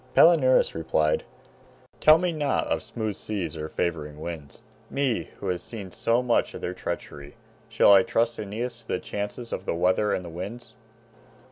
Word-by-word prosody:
Palinurus 145 Hz, -7 st, +6 dB
replied, 80 Hz, -1 st, +1 dB, 0.7 s
"Tell 155 Hz, +1 st, +7 dB
me 180 Hz, +1 st, 0 dB
not 150 Hz, -3 st, 0 dB
of -, -, -1 dB
smooth 110 Hz, -3 st, -4 dB
seas 95 Hz, -8 st, -4 dB
or 80 Hz, 0 st, -5 dB
favoring 75 Hz, -4 st, -3 dB
winds, 80 Hz, -3 st, -7 dB, 0.3 s
me 135 Hz, -4 st, 0 dB
who 100 Hz, -, -4 dB
have 90 Hz, -1 st, -1 dB
seen 100 Hz, -5 st, -8 dB
so 115 Hz, +6 st, +1 dB
much 120 Hz, -2 st, +1 dB
of -, -, -7 dB
their 90 Hz, -, -3 dB
treachery. 70 Hz, -5 st, -6 dB, 0.3 s
Shall 100 Hz, -, +6 dB
I 95 Hz, -, +8 dB
trust 115 Hz, 0 st, 0 dB
Aeneas 115 Hz, +4 st, -4 dB
to 110 Hz, -, -19 dB
the -, -, -1 dB
chances 115 Hz, +1 st, -5 dB
of -, -, -4 dB
the -, -, 0 dB
weather 90 Hz, +4 st, +2 dB
and 90 Hz, -, -1 dB
the -, -, -7 dB
winds?" 100 Hz, +8 st, -7 dB
105 Hz, 170 wpm, -26 LUFS, 85-120 Hz, 0.7 s, I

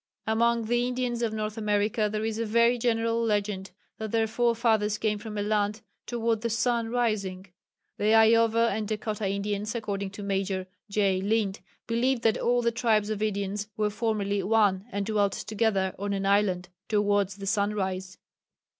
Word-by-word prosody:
Amongst 230 Hz, +1 st, +1 dB
the 240 Hz, +1 st, +1 dB
Indians 250 Hz, -1 st, -2 dB
of 230 Hz, -2 st, 0 dB
North 215 Hz, 0 st, -3 dB
America 210 Hz, 0 st, +1 dB
there 215 Hz, 0 st, -2 dB
is 220 Hz, 0 st, -2 dB
a -, -, +1 dB
very 235 Hz, +2 st, +3 dB
general 230 Hz, 0 st, +1 dB
legend 205 Hz, -3 st, -1 dB, 0.3 s
that 220 Hz, 0 st, -4 dB
their 225 Hz, +1 st, +2 dB
forefathers 225 Hz, -2 st, +1 dB
came 210 Hz, -1 st, -1 dB
from 215 Hz, -1 st, -7 dB
a 205 Hz, -, 0 dB
land 210 Hz, 0 st, 0 dB, 0.3 s
"toward 230 Hz, -2 st, 0 dB
the 235 Hz, -, -1 dB
sun 230 Hz, 0 st, 0 dB
rising." 210 Hz, -6 st, -1 dB, 0.5 s
The 215 Hz, +2 st, +4 dB
Iowa 230 Hz, +1 st, +5 dB
and 215 Hz, -1 st, -2 dB
Dakota 215 Hz, -1 st, -2 dB
Indians, 205 Hz, +2 st, -2 dB
according 200 Hz, -3 st, -3 dB
to 205 Hz, -, -7 dB
Major 195 Hz, -1 st, -1 dB, 0.2 s
J. 200 Hz, -2 st, +1 dB
Lind, 205 Hz, -1 st, 0 dB, 0.3 s
believed 235 Hz, +2 st, 0 dB
that 225 Hz, -1 st, +3 dB
"all 245 Hz, 0 st, +2 dB
the 235 Hz, -, +2 dB
tribes 220 Hz, -2 st, +1 dB
of 210 Hz, -1 st, -3 dB
Indians 205 Hz, -1 st, -2 dB
were 210 Hz, -1 st, +1 dB
formerly 205 Hz, -2 st, -1 dB
one 200 Hz, -1 st, +2 dB
and 200 Hz, 0 st, -2 dB
dwelt 205 Hz, -2 st, +1 dB
together 210 Hz, -4 st, 0 dB
on 200 Hz, 0 st, -2 dB
an 195 Hz, 0 st, -2 dB
island... 195 Hz, -3 st, +2 dB, 0.2 s
towards 205 Hz, -2 st, +1 dB
the 200 Hz, -, -7 dB
sunrise." 195 Hz, -3 st, -1 dB
215 Hz, 165 wpm, -27 LUFS, 200-230 Hz, 0.5 s, Iowa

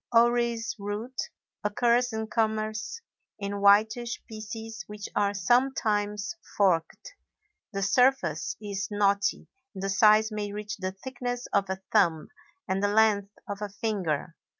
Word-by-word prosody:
Orris 235 Hz, -1 st, +3 dB
root 210 Hz, +5 st, -4 dB, 0.3 s
occurs 240 Hz, +4 st, +2 dB
in 220 Hz, 0 st, -2 dB
commerce 220 Hz, -, -1 dB, 0.4 s
in 200 Hz, 0 st, -4 dB
whitish 220 Hz, +4 st, +4 dB
pieces 220 Hz, 0 st, -7 dB
which 210 Hz, -1 st, -7 dB
are 205 Hz, 0 st, +1 dB
sometimes 210 Hz, -, +1 dB, 0.2 s
forked; 195 Hz, -, +1 dB, 0.6 s
the 195 Hz, -1 st, -2 dB
surface 255 Hz, +6 st, +2 dB
is 205 Hz, -1 st, -4 dB
knotty, 200 Hz, -1 st, +1 dB, 0.3 s
and 190 Hz, -, -6 dB
the 195 Hz, -, -1 dB
size 215 Hz, +2 st, +5 dB
may 210 Hz, -1 st, -3 dB
reach 210 Hz, 0 st, -5 dB
the 185 Hz, -1 st, -3 dB
thickness 245 Hz, +4 st, -5 dB
of 200 Hz, -1 st, +2 dB
a 190 Hz, 0 st, -4 dB
thumb 160 Hz, -2 st, +3 dB, 0.4 s
and 190 Hz, +1 st, 0 dB
the 205 Hz, -, +3 dB
length 205 Hz, -1 st, +3 dB
of 200 Hz, -1 st, -4 dB
a 210 Hz, -, -3 dB
finger. 185 Hz, -7 st, -2 dB
210 Hz, 130 wpm, -28 LUFS, 200-225 Hz, 0.6 s, size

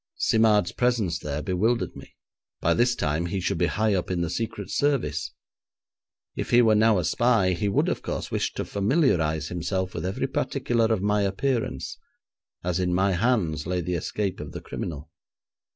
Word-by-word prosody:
Simard's 110 Hz, -4 st, +3 dB
presence 115 Hz, -9 st, 0 dB
there 75 Hz, 0 st, -4 dB
bewildered 110 Hz, +6 st, 0 dB
me; -, -, -12 dB, 0.4 s
by -, -, +2 dB
this 120 Hz, 0 st, +2 dB
time 75 Hz, 0 st, -1 dB
he 95 Hz, +2 st, -2 dB
should 90 Hz, -, -1 dB
be -, -, +3 dB
high 110 Hz, 0 st, +1 dB
up 90 Hz, -2 st, -1 dB
in 90 Hz, -2 st, -1 dB
the 85 Hz, -1 st, -1 dB
Secret 105 Hz, -1 st, -4 dB
Service. 125 Hz, -, 0 dB, 1.0 s
If -, -, -4 dB
he 120 Hz, 0 st, +6 dB
were 110 Hz, -1 st, +5 dB
now 110 Hz, 0 st, +4 dB
a 90 Hz, -, 0 dB
spy, 115 Hz, -1 st, +3 dB
he 95 Hz, +3 st, -1 dB
would, -, -, +2 dB
of -, -, -1 dB
course, -, -, -4 dB
wish -, -, 0 dB
to -, -, -3 dB
familiarise 95 Hz, -, +1 dB
himself 95 Hz, +2 st, -2 dB
with 80 Hz, -, -4 dB
every 95 Hz, +1 st, -1 dB
particular 115 Hz, -2 st, 0 dB
of 110 Hz, -4 st, 0 dB
my 105 Hz, 0 st, +2 dB
appearance, 115 Hz, +5 st, -1 dB, 0.6 s
as 90 Hz, 0 st, -1 dB
in 90 Hz, -1 st, +1 dB
my 95 Hz, +2 st, +2 dB
hands 90 Hz, -7 st, 0 dB
lay 90 Hz, 0 st, 0 dB
the 90 Hz, +1 st, -2 dB
escape 95 Hz, +3 st, -2 dB
of -, -, -7 dB
the -, -, -6 dB
criminal. 75 Hz, -1 st, -6 dB
95 Hz, 180 wpm, -25 LUFS, 85-115 Hz, 1.0 s, he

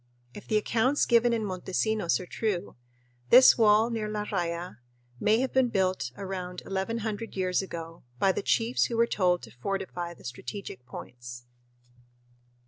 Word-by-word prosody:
If 205 Hz, -, -11 dB
the 215 Hz, -, +2 dB
accounts 240 Hz, +6 st, +2 dB
given 240 Hz, 0 st, +4 dB
in 225 Hz, -2 st, 0 dB
Montesinos 190 Hz, +1 st, 0 dB
are 185 Hz, -, -7 dB
true, 200 Hz, -1 st, -3 dB, 0.5 s
this 255 Hz, +1 st, +9 dB
wall 220 Hz, +1 st, +4 dB
near 220 Hz, -2 st, -2 dB
La 210 Hz, 0 st, -3 dB
Raya 175 Hz, -, -3 dB, 0.4 s
may 220 Hz, +3 st, +3 dB
have 265 Hz, -, -2 dB
been 260 Hz, -2 st, +3 dB
built 185 Hz, -, 0 dB
about 185 Hz, -2 st, -6 dB
1100 220 Hz, +3 st, -3 dB
years 185 Hz, -1 st, +1 dB
ago, 165 Hz, -3 st, -7 dB, 0.2 s
by 190 Hz, +9 st, +3 dB
the -, -, -3 dB
chiefs 230 Hz, +4 st, +2 dB
who 235 Hz, -, -3 dB
were 230 Hz, -, +5 dB
told 180 Hz, -, +1 dB
to 110 Hz, -, -11 dB
"fortify 175 Hz, -, -4 dB
the -, -, -18 dB
strategic 125 Hz, -, -7 dB
points." 120 Hz, -1 st, -9 dB
195 Hz, 150 wpm, -28 LUFS, 175-225 Hz, 0.5 s, this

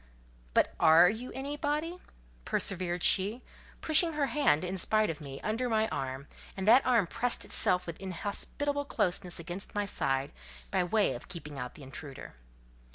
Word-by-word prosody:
"But -, -, +3 dB
are 165 Hz, +3 st, +7 dB
you 235 Hz, +4 st, -7 dB
anybody?" 295 Hz, +5 st, -3 dB, 0.4 s
persevered 180 Hz, -, 0 dB
she, 210 Hz, +6 st, +4 dB, 0.4 s
pushing 325 Hz, +1 st, +4 dB
her 295 Hz, -2 st, 0 dB
hand, 245 Hz, -, +2 dB
in 185 Hz, +1 st, -3 dB
spite 215 Hz, +1 st, +2 dB
of 160 Hz, -, -9 dB
me, 135 Hz, -2 st, -8 dB
under 230 Hz, +4 st, -2 dB
my 220 Hz, -1 st, +1 dB
arm; 135 Hz, +1 st, -4 dB, 0.3 s
and 190 Hz, +1 st, -3 dB
that 245 Hz, +5 st, +7 dB
arm 235 Hz, -6 st, +3 dB
pressed 235 Hz, +7 st, -1 dB
itself 180 Hz, 0 st, +3 dB
with 170 Hz, +1 st, -8 dB
inhospitable 210 Hz, +10 st, -3 dB
closeness 180 Hz, -7 st, -1 dB
against 175 Hz, +5 st, -6 dB
my 205 Hz, 0 st, 0 dB
side, 135 Hz, -6 st, -1 dB, 0.4 s
by 190 Hz, -2 st, +1 dB
way 205 Hz, +4 st, +1 dB
of -, -, -9 dB
keeping 150 Hz, -5 st, -8 dB
out 125 Hz, -1 st, -6 dB
the 150 Hz, -, -12 dB
intruder. 135 Hz, +1 st, -9 dB
195 Hz, 160 wpm, -30 LUFS, 165-250 Hz, 0.4 s, are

